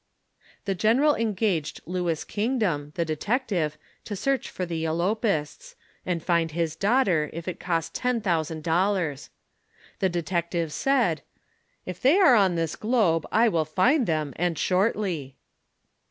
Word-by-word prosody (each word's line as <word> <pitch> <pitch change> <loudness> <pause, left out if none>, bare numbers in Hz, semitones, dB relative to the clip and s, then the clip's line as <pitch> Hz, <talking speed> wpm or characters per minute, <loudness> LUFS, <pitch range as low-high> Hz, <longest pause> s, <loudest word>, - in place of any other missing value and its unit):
The 195 - 0
general 235 - +3
engaged 205 - -1
Louis 175 -2 -2
Kingdom, 205 - -1
the 170 - 0
detective, 170 - -1 0.3
to 205 - -4
search 270 +7 -1
for 185 - -4
the 165 -2 -3
elopists, 195 - -1 0.3
and 170 -3 -1
find 170 -2 +1
his 165 0 -2
daughter, 195 - +2
if 170 +1 -7
it 180 - -4
cost 165 -3 -2
ten 250 -1 0
thousand 160 -6 -1
dollars. 170 -4 0 0.7
The 190 - +2
detective 170 -1 -2
said: 240 - +1 0.3
" - - -41
Tf 180 -1 -6
they 280 +8 +5
are 360 -10 +7
on 195 -6 +4
this 165 -2 -1
globe, 210 -9 +1
I 230 +2 +4
will 170 -7 +2
find 235 - +2
them, 155 -3 -1
and 175 -1 0
shortly." 185 - 0
180 Hz, 140 wpm, -26 LUFS, 160-220 Hz, 0.7 s, are